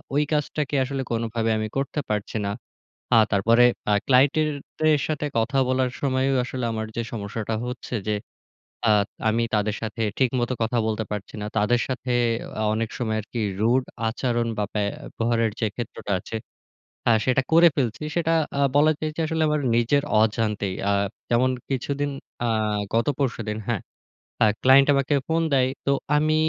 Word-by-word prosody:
ওই 145 - +4
কাজটাকে 150 -1 -1
আসলে 135 +1 -3
কোনভাবে 115 0 -1
আমি 110 0 -2
করতে 135 +2 -1
পারছি 105 0 -2
না। - - -1 0.7
আ - - +7 0.2
তারপরে 115 +5 +5 0.3
আ - - +4
ক্লায়েন্টদের 145 +2 +2
সাথে 150 -1 -1
কথা 125 +5 +1
বলার 130 0 +1
সময়ও 135 0 +1
আসলে 125 0 -4
আমার 110 0 -3
যে 115 - 0
সমস্যাটা 110 0 -3
হচ্ছে 125 0 -6
যে - - +2 0.8
আ - - +5 0.4
আমি 115 +2 +2
তাদের 105 0 +1
সাথে 110 +1 -5 0.2
ঠিক 130 -3 +3
মতো 120 +1 -1
কথা 115 +2 0
বলতে 110 0 -1
পারছি 105 -1 -5
না। 105 - -4
তাদের 120 +4 +2
সাথে 130 -1 -4 0.4
অ্যা 110 - -2
অনেক 115 0 -2
সময় 110 -3 -1
আরকি 110 +3 -7 0.2
rude 125 +4 +2 0.2
আচরণ 120 0 -1
বা 105 - +1
ব্যবহারের 115 +2 -1
যে 110 - +2
ক্ষেত্রটা 115 -3 -5
আছে, 115 - -6 0.7
হ্যাঁ, 115 -2 +5
সেটা 130 +1 +3
করে 170 +1 +8
ফেলছি। 125 0 -1
সেটা 165 -1 +1 0.3
আ - - +2 0.2
বলা 155 +2 +5
যায় 155 - -2
যে - - -2
আসলে 160 0 -1
আমার 150 0 +1 0.2
নিজের 120 +5 +3 0.2
অজান্তেই। 105 -3 0 0.2
আ - - +3 0.4
যেমন 125 +2 +3 0.2
কিছুদিন 140 +2 -1 0.4
আ - - +1 0.5
গত 115 +1 +2
পরশুদিন, 115 -6 -2
হ্যাঁ? 115 -5 -1 0.6
আ - - +6 0.2
ক্লায়েন্ট 135 +2 +6
আমাকে 140 +1 +1
ফোন 165 +1 +1
দেয়। 130 -1 +3 0.2
তো 140 - +3 0.2
আমি 155 +1 +2
120 Hz, 165 wpm, -24 LUFS, 110-140 Hz, 0.8 s, করে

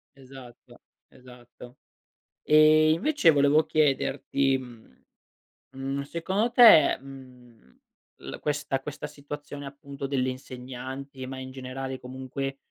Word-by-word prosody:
Esatto, 130 -2 -15 0.3
esatto. 125 -1 -15 0.7
E 155 +1 +5
invece 180 - +3
volevo 145 +2 +4
chiederti, 140 -2 +1
mhmm, 120 - -13 0.8
mhmm, 135 +1 -4
secondo 190 +10 -2
te, 230 - +7
mhmm, 125 - -15 0.4
l - - -8
questa 145 -2 -2
questa 150 +1 -7
situazione 145 0 -9
appunto 140 0 -8
delle 130 -2 0
insegnanti, 130 +1 -8
ma 130 0 -7
in 130 0 -8
generale 130 0 -6
comunque, 130 +2 -6
135 Hz, 105 wpm, -26 LUFS, 130-145 Hz, 0.8 s, te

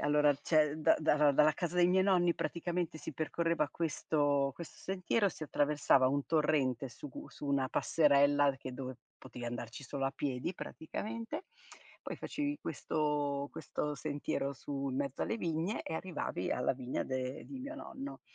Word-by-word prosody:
allora 145 0 +4
cioè 150 +1 +2
da 155 - +5
dara 150 -2 +4
dalla 150 +2 +5
casa 175 +2 -3
dei 175 0 +6
miei 185 +1 +4
nonni 175 -3 +4
praticamente 170 -1 -2
si - - -6
percorreva 165 +1 0
questo 145 -3 +1
questo 170 - -9
sentiero, 195 +2 +1
si 160 - -6
attraversava 145 -3 +3
un 140 +1 0
torrente 140 -5 +2
su 130 +5 -9
u - - -8
su 145 - -8
una 135 -2 +2
passerella 145 -2 +4
che 130 - -6
dove 130 -1 -5 0.2
potevi 120 - -8
andarci 120 +2 -5
solo 135 +1 -2
a - - 0
piedi 140 +5 -2
praticamente, 230 - -5 0.6
poi - - -5
facevi 290 0 -2
questo 145 -2 -1
questo 150 0 -3
sentiero 145 -1 -2
su 140 +3 -4
in 130 - -3
mezzo 140 -1 -1
alle 225 - -1
vigne 170 +2 -1
e - - -4
arrivavi 160 - -3
alla 125 - +2
vigna 125 -1 -3
de 130 0 -3
di 270 - -7
mio 285 +4 -5
nonno. 275 0 -7
150 Hz, 165 wpm, -34 LUFS, 140-170 Hz, 0.6 s, dei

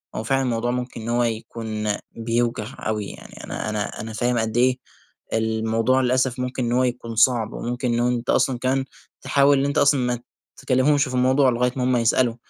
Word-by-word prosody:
هو 110 - -3
فعلًا 135 +4 +1
الموضوع 120 -1 -1
ممكن 125 -1 -4
إن 115 - -5
هو 120 +1 +2
يكون 110 -1 -4 0.2
بيوجع 115 -1 -1 0.2
أوي 105 -1 -1
يعني، - - -11
أنا - - -4
أنا 105 -1 -3
أنا 110 +1 -6
فاهم 120 +3 0
قد 110 0 -1
إيه 125 +1 +3 0.6
الموضوع 110 +3 +1
للأسف 130 0 +1
ممكن 125 0 -2
إن 120 - -1
هو 125 +1 +3
يكون 120 -2 -3
صعب، 115 -1 +3
وممكن 120 0 -2
إنه 120 +1 +1
أنت 125 0 -2
أصلًا 130 -3 +2
كمان 130 +1 0 0.4
تحاول 140 +1 +3
إن 135 - +1
أنت 140 - -1
أصلًا 145 -1 +4
ما 125 -1 -1 0.4
تكلمهمش 140 +2 +2
في 130 - -6
الموضوع 130 +2 +4
لغاية 125 +1 +1
ما 130 - -1
هُم 125 0 +2
يسألوا، 115 0 +2
120 Hz, 190 wpm, -23 LUFS, 115-130 Hz, 0.6 s, أصلًا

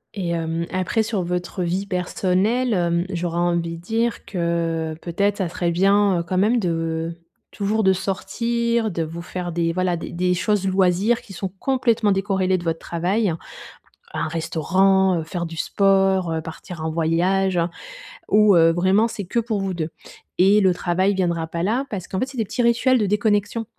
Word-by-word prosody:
Et 185 -4 -3
hem, 165 0 -2
après 185 +4 0
sur 215 -3 -2
votre 180 +1 -3
vie 180 +3 -1
personnelle, 195 +6 0
hem, 170 -1 +1
j'aurais 170 -1 -2
envie 170 -1 0
de 165 - -12
dire 225 +4 -1
que 165 -3 -1
peut-être 200 +4 0
ça 185 -4 -1
serait 175 0 -1
bien, 195 +1 +3
heu, - - -2
quand 185 +2 -3
même 220 +5 +3
de, 165 -2 -2 0.4
toujours, 215 +2 -1
de 190 -1 +5
sortir, 230 +4 -1
de 170 -4 -2
vous 165 +2 -6
faire 175 0 -5
des 165 0 0
voilà 180 0 0
des - - -7
des 180 +1 0
choses 195 +2 0
loisirs 190 +5 +2
qui 200 - -13
sont 190 +1 -4
complètement 235 -5 +1
décorrélées 190 -1 +1
de 175 - -7
votre 165 -1 -1
travail. 180 +3 0 0.8
Un 155 +1 -2
restaurant, 185 +3 +2
heu, 160 - -6
faire 170 +1 -4
du 165 0 -8
sport, 195 -1 +2
heu, 160 0 -2
partir 160 +1 -8
en 160 - -1
voyage, 175 +4 +1 0.7
où, 210 -2 +5
heu, 165 0 +6
vraiment, 190 +6 +3
c'est 215 -3 -6
que 235 - -1
pour 220 -3 -2
vous 195 -1 -2
2 165 -2 -3 0.5
et 195 +3 +5
le 190 -2 +4
travail 185 +3 +1
viendra 170 -3 0
pas 170 +1 -4
là 235 +8 0
parce 190 -4 -5
qu'en 190 - -3
fait, 255 - -1
c'est 270 -2 -10
des 225 - 0
petits 245 - -2
rituels 240 +2 +3
de 210 - +1
déconnexion, 210 +2 0
185 Hz, 185 wpm, -22 LUFS, 170-205 Hz, 0.8 s, heu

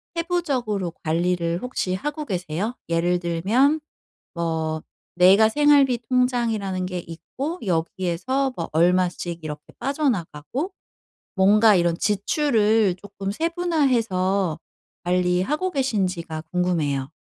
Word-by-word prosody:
세부적으로 270 - -1
관리를 170 +1 0
혹시 250 -7 -2
하고 295 +10 -4
계세요? 185 - -3
예를 175 +1 +1
들면 215 - +2 0.5
뭐 160 -2 -2 0.3
내가 190 +5 +6
생활비 285 -2 +4
통장이라는 230 -7 0
게 180 0 -4
있고 260 - -6
여기에서 185 +10 -1
뭐 165 - -4
얼마씩 175 0 +1
이렇게 150 -1 -6 0.2
빠져나가고. 265 - -2 0.6
뭔가 210 +2 +5
이런 170 -2 +2
지출을 215 - +2
쪼끔 195 -1 -5
세분화해서 230 - 0 0.4
관리하고 180 - +1
계신지가 185 - -1
궁금해요. 155 -7 0
190 Hz, 260 characters per minute, -23 LUFS, 170-255 Hz, 0.6 s, 내가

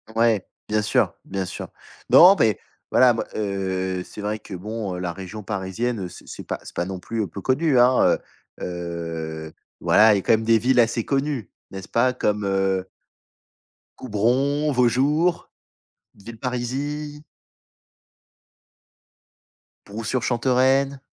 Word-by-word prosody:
Ouais, 115 -4 +2 0.2
bien 110 0 +1
sûr, 105 - +1
bien 95 -1 -3
sûr. - - -6 0.4
Non, 185 +3 +9
beh, 110 - +2 0.3
voilà 125 -1 +6
moi, 115 - -3
heu, 95 -3 -2
c'est 105 - -10
vrai 105 +1 -2
que, 100 - -11
bon, 100 0 -4
heu, - - -5
la 90 -1 -2
région 95 +3 -8
parisienne, 100 +1 -3
c - - -13
c'est - - -10
pas 85 - -4
non 95 0 -5
plus 110 +1 -3
peu 100 +3 -8
connu, 135 +3 +2
hein, 125 +1 +4 0.4
heu, 85 -2 -5 0.3
voilà, 110 0 +6
il 100 - +2
y - - 0
a - - -4
quand - - +2
même 110 0 +2
des 115 -1 +4
villes 125 +1 +2
assez 115 -1 +2
connues, 135 -6 -2 0.2
n'est-ce 95 0 -8
pas? 125 +2 +2
Comme, 105 -4 -1
heu 95 -1 0 1.1
Coubron, 130 +7 +1
Vaujours, 140 +8 +2 0.7
Villeparisis 130 +7 -5 2.6
Brou-Sur-Chantereine 130 +4 +1
110 Hz, 130 wpm, -23 LUFS, 95-130 Hz, 2.6 s, Non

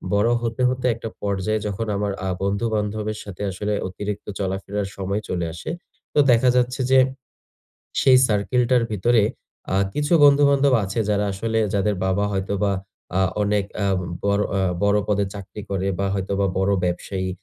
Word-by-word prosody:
বড় 105 +3 +3
হতে, 115 +1 -2
হতে 125 0 -3
একটা 115 -1 -6
পর্যায়ে 100 +2 -1
যখন 105 +2 -3
আমার 100 0 -1 0.2
আ - - 0
বন্ধু-বান্ধবের 105 +1 -1
সাথে 100 -2 -9
আসলে 105 +3 -2
অতিরিক্ত 100 +2 -5
চলাফেরার 95 +1 -2
সময় 100 +2 -2
চলে 85 -2 -1
আসে। 85 - -7 0.4
তো - - +3
দেখা 120 +2 +4
যাচ্ছে 125 +1 +1
যে, 130 - +7 1.0
সেই 130 -1 +6
সার্কেলটার 120 +3 +2
ভিতরে 115 +3 +3 0.5
আ - - +3 0.2
কিছু 150 +3 -1
বন্ধু-বান্ধব 140 -1 +5
আছে, 100 +4 -4
যারা 105 0 +1
আসলে 110 +3 -1 0.2
যাদের 100 +1 +1
বাবা 100 +2 +1
হয়তোবা 100 +1 0 0.5
আ - - +3 0.2
অনেক 105 -1 +1 0.2
আ - - +2 0.4
বড় 100 0 +2 0.2
আ - - +2 0.2
বড় 100 +1 +3
পদে 100 -1 +2
চাকরি 100 +1 -8
করে 95 0 -1
বা, 100 - 0
হয়তোবা 100 0 0
বড় 95 +1 +2
ব্যবসায়ী। 95 +1 -2
105 Hz, 155 wpm, -22 LUFS, 100-115 Hz, 1.0 s, যে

